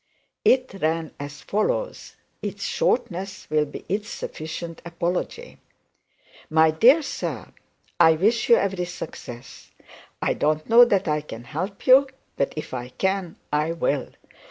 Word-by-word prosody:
It 255 -2 +3
ran 160 0 0
as 145 0 -7
follows. - - -2 0.3
Its - - -5
shortness 190 - -1
will 155 -1 +3
be 145 - -9
its 205 +3 -2
sufficient 165 +1 -6
apology: 175 - -3 0.9
My 160 0 +5
dear 255 - +6
Sir, - - -5 0.5
I 160 - +7
wish 210 +9 +1
you 235 - +9
every 195 -4 0
success. 125 -7 -9 0.5
I - - +1
don't 155 +1 0
know 235 +2 +8
that 200 -5 +1
I 150 0 +1
can 120 -6 -9
help 180 - -5
you, 270 +2 +7 0.3
but 140 - 0
if 155 - -6
I 125 -1 -4
can 190 +4 -1 0.2
I 150 +2 +1
will. 145 -5 -1
170 Hz, 135 wpm, -24 LUFS, 155-205 Hz, 0.9 s, you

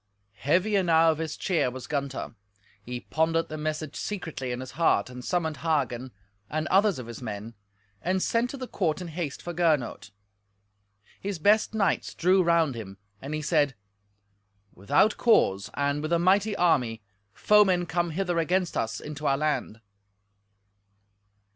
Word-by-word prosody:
Heavy 180 - +2
enow 165 -4 +4
of 155 - -4
his 160 -2 -4
cheer 170 -8 +1
was 130 0 -8
Gunther. 140 -4 -3 0.5
He 125 0 -6
pondered 165 +1 0
the 155 - -5
message 155 -1 -3
secretly 160 -11 -4
in 125 - -3
his 130 0 -7
heart, 160 -4 +1
and 125 0 -9
summoned 160 -3 -1
Hagen, 130 -6 -1 0.4
and 155 0 -2
others 200 -2 +3
of 125 - -6
his 120 +1 -9
men, 110 -1 -6 0.5
and 185 +2 0
sent 230 +5 +1
to 275 - -6
the 255 -1 -6
court 170 -8 -1
in 180 -2 -6
haste 160 -3 -5
for 175 - -5
Gernot. 155 -10 0 1.1
His 200 -2 -4
best 210 +6 +3
knights 200 -5 0
drew 185 +2 +4
round 170 -4 +3
him, 100 -5 -8 0.2
and 140 +3 -4
he 155 - -4
said, 140 -2 +2 1.0
"Without 100 - +2
cause, 100 - +3
and 145 +1 0
with 155 +2 -2
a - - +5
mighty 195 +4 +3
army, 125 - +1 0.3
foemen 190 - +4
come 175 0 -1
hither 175 +1 -1
against 180 +2 0
us 110 0 -2
into 150 0 -5
our 135 0 +3
land." 145 -7 -2
160 Hz, 155 wpm, -27 LUFS, 135-180 Hz, 1.1 s, a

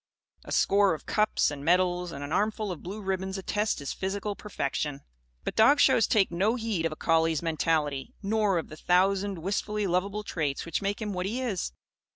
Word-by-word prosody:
A - - -9
score 200 -3 +3
of - - -12
cups 215 -7 +2
and 145 -1 -7
medals 180 +1 +2
and 140 -2 -6
an 145 - -6
armful 210 +2 0
of 175 - -6
blue 200 +4 -7
ribbons 190 0 -2
attest 205 +2 -1
his 140 - -4
physical 200 +2 -3
perfection. 150 -9 -3 0.4
But - - -4
dog 275 +7 +6
shows 225 - +5
take 200 -5 +3
no 195 +7 +1
heed 220 -9 -1
of - - -8
a - - -5
collie's 165 -1 +1
mentality, 155 -4 0
nor 205 -2 +2
of 165 - -3
the 155 - -10
thousand 190 +3 +2
wistfully 205 +4 -2
lovable 195 +3 -1
traits 150 -8 -2
which 170 +3 -2
make 205 +2 -2
him 210 -1 -3
what 180 0 -2
he 230 +6 -2
is. 225 - -2
190 Hz, 190 wpm, -28 LUFS, 165-210 Hz, 0.4 s, dog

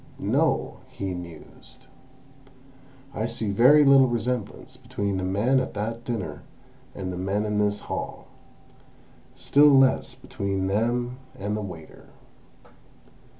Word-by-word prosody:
"No," - - 0
he 95 -1 -5
mused, 85 -3 -11 1.3
"I 110 - -2
see 115 -3 -3
very 135 +8 +6
little 135 -1 +6
resemblance 120 +1 -3
between 120 -6 -3
the 95 - -3
men 105 +8 +2
at 130 - -4
that 115 +3 -4
dinner 115 -5 -4 0.5
and 95 -2 -5
the - - -6
men 95 +3 -1
in 105 0 -1
this 105 0 0
hall; - - -6 1.1
still 145 +1 +4
less 135 -2 +3
between 95 -1 -3
them 120 +5 -1 0.2
and 105 +2 -3
the 105 - -3
waiter. 85 -6 -10
105 Hz, 120 wpm, -25 LUFS, 100-125 Hz, 1.3 s, very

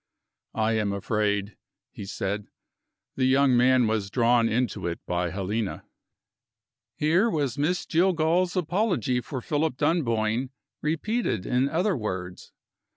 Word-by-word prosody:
"I 110 0 +1
am 100 -2 -1
afraid," 105 0 -1 0.3
he 100 - -8
said, 100 +1 -3 0.7
"the 130 - +1
young 130 0 +4
man 125 0 +4
was 110 -3 -1
drawn 115 0 +3
into 120 -5 -1
it 85 - -3
by 90 0 -1
Helena." 100 +3 -3 1.1
Here 175 +9 +2
was 145 - -1
Miss 175 +5 0
Jillgall's 175 +1 +2
apology 175 - 0
for 130 0 -6
Philip 150 0 -1
Dunboyne 125 -6 0 0.3
repeated 160 - -1
in 125 +2 +1
other 180 +6 +1
words. 90 -6 -5
125 Hz, 120 wpm, -26 LUFS, 105-160 Hz, 1.1 s, young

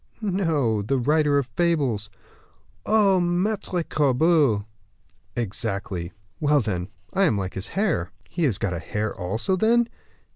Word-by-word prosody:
"No, 160 - +1
the 135 +7 0
writer 145 +3 +3
of 140 - +1
fables." 130 -7 0 0.8
"Oh! 205 -3 +4
Maitre 180 +1 0
Corbeau!" 145 -6 +2 0.7
"Exactly; 100 -5 -3 0.3
well, 150 -2 +3
then, 95 -7 -2 0.3
I 195 0 +3
am 130 - +2
like 95 -2 -3
his 95 - -4
hare." 190 - -1 0.2
"He 175 - -5
has 115 -9 +1
got 95 - -1
a 85 - -3
hare 105 +6 -3
also, 105 - -1
then?" 230 +4 +3
140 Hz, 135 wpm, -24 LUFS, 105-175 Hz, 0.8 s, Oh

